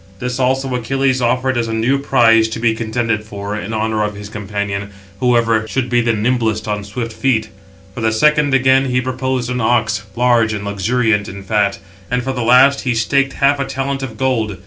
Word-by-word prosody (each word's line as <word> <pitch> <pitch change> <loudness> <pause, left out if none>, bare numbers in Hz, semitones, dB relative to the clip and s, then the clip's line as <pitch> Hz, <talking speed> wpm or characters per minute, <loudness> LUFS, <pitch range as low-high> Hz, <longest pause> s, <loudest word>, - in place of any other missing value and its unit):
This 125 +4 -4
also 130 +1 0
Achilles 130 +2 0
offered 125 +1 +1
as 115 - -1
a 115 - -3
new 125 +5 +1
prize, 115 -5 +4
to 110 +1 -5
be 115 -1 +2
contended 115 -1 -2
for, 100 -1 -6
in 105 0 -5
honour 110 -1 -1
of 105 0 -3
his 100 0 -9
companion, 100 -1 -4 0.3
whoever 115 -3 +2
should 125 +1 -2
be 120 0 +3
the 120 0 +1
nimblest 110 -1 0
on 105 -1 -2
swift 115 +3 -5
feet; 110 -2 0 0.4
for 115 - -6
the 110 0 +1
second, 150 +5 +3
again, 130 +1 +4
he 125 -1 0
proposed 130 -1 -2
an 125 0 -2
ox, 115 -1 +1
large 120 -2 +2
and 100 -1 -5
luxuriant 105 +1 0
in 100 +1 -9
fat; 100 -1 0 0.3
and 125 0 -1
for 135 - -2
the 125 - -3
last 130 +4 +5
he 125 -2 -1
staked 140 +4 +1
half 140 0 +2
a 140 - -1
talent 135 0 -3
of 120 -5 -6
gold. 115 -6 -1
115 Hz, 200 wpm, -17 LUFS, 110-130 Hz, 0.4 s, last